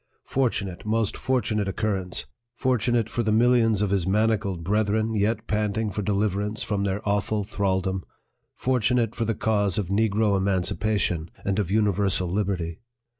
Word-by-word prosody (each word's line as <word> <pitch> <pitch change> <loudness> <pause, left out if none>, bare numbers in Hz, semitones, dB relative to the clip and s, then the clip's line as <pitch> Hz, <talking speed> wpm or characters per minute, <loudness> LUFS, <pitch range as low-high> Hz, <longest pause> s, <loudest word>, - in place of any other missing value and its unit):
Fortunate, 105 -9 -1
most 110 -1 0
fortunate 110 -6 0
occurrence! 95 -3 -2 0.3
fortunate 120 -3 +1
for 120 - -2
the 110 -2 0
millions 115 -2 +4
of 100 - 0
his 95 -3 +1
manacled 105 -3 +1
brethren, 110 +3 +1
yet 105 +2 0
panting 105 0 -1
for 105 - -3
deliverance 105 +1 -1
from 100 -2 -1
their 100 +2 -2
awful 105 +1 0
thraldom! 95 -2 -1 0.5
fortunate 125 -2 +1
for 115 - -2
the 115 0 0
cause 100 -4 +1
of 100 -4 -1
negro 105 0 +2
emancipation, 95 -2 0 0.2
and 100 +1 0
of 100 -4 -1
universal 100 -3 +1
liberty 90 -3 -2
105 Hz, 140 wpm, -25 LUFS, 95-110 Hz, 0.5 s, millions